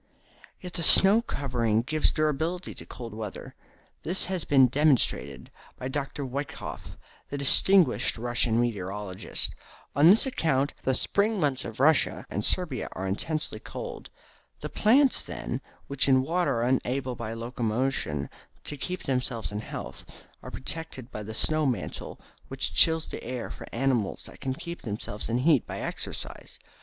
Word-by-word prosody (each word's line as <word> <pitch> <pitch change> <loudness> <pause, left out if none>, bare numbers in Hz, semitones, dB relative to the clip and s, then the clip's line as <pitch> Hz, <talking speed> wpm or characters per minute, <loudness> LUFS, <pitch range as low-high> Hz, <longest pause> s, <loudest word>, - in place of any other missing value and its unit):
Yet 180 -1 -8
the - - -2
snow 195 +6 +7
covering 120 - 0
gives 155 +4 +1
durability 155 +4 -1
to - - -11
cold 115 -3 -8
weather. 110 -2 -7 0.5
This 180 +4 -1
has 185 -3 -2
been 135 -2 +6
demonstrated 125 - +1 0.3
by 130 - -4
Dr. 140 0 -3
Woeikof, 140 +3 -6 0.3
the 145 - -4
distinguished 175 +6 +4
Russian 120 -1 +1
meteorologist. 100 -4 -1 0.4
On 145 +4 +6
this 210 +8 +6
account 145 - 0
the 130 - +1
spring 205 - +1
months 140 -5 +1
of 115 0 -7
Russia 150 +1 +3
and 105 +4 -2
Siberia 155 - 0
are 95 - -4
intensely 150 +11 -1
cold. 485 -2 -7 0.5
The - - -4
plants, 260 +5 +4
then, - - -5 0.2
which 140 0 +1
in 130 -1 +5
winter 175 +2 +1
are - - +1
unable 130 +1 0
by 115 -2 -5
locomotion 115 - -1 0.4
to 145 - -5
keep 180 +6 -4
themselves 125 -6 -2
in 105 - -3
health, 110 - -7 0.4
are - - -8
protected 135 -3 -5
by 105 - -5
the 110 +1 -6
snow 155 +4 +2
mantle 125 -4 -4 0.3
which - - -3
chills 160 -1 +5
the - - -7
air 125 0 -5
for - - -9
animals 120 -5 0
that - - -11
can 130 -1 -2
keep 170 +4 -7
themselves 105 -1 -4
in 115 - +1
heat 140 0 +3
by - - -5
exercise. - - -6
130 Hz, 150 wpm, -27 LUFS, 115-155 Hz, 0.5 s, snow